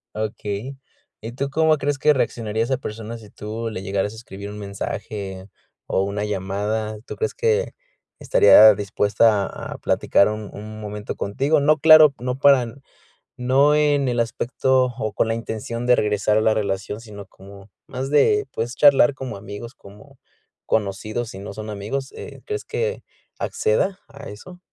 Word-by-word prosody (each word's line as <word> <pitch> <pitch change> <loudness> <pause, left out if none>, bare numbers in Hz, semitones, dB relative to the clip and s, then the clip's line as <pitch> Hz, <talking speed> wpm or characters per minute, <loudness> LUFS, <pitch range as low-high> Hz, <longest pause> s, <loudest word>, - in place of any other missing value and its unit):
Okey. 110 +4 -4 0.4
¿Y 115 +2 -6
tú 140 +3 -3
cómo 160 +2 +3
crees 145 -1 -1
que 150 +3 +4
reaccionaría 115 -4 -2
esa 130 +2 -1
persona 115 -1 -7
si 105 -2 -15
tú 110 +2 -5
le 95 -3 -6
llegaras 100 +1 -2
a - - -11
escribir 100 -2 -9
un 105 - -8
mensaje 100 -1 -6 0.4
o 95 - +1
una 100 +1 -3
llamada? 105 +2 -3
¿Tú - - -6
crees 445 - -2
que 465 +1 0 0.5
estaría 110 - +7
dispuesta 105 +1 +2
a - - -8
platicar 100 - +2
un 105 -1 -6
un 110 +1 -9
momento 105 -1 -6
contigo? 140 +10 0
No, 155 +2 +3
claro 155 -1 +8
no 125 +1 -3
para 130 -5 +4 0.6
no 135 +4 +3
en 145 -2 +2
el 120 -1 0
aspecto 130 +3 +1
o 110 -1 -3
con 110 - +1
la 115 - 0
intención 115 +1 -5
de 125 0 +5
regresar 105 0 +1
a - - 0
la 110 0 +2
relación, 100 +1 -3
sino 105 -4 -11
como 100 +1 -15 0.2
más 130 +1 -5
de, 420 - +3
puedes 120 +3 -4
charlar 145 0 +5
como 130 -5 -7
amigos, 105 +5 -9
como 105 +8 -16 0.5
conocidos, 110 +3 -2
si 95 - -9
no 100 0 -8
son 110 +1 -7
amigos, 110 +7 -4
eh, - - -10
¿crees 425 -2 -4
que 465 +1 -3 0.3
acceda 440 - 0
a 140 0 -11
eso? 180 - -12
110 Hz, 165 wpm, -22 LUFS, 105-135 Hz, 0.6 s, claro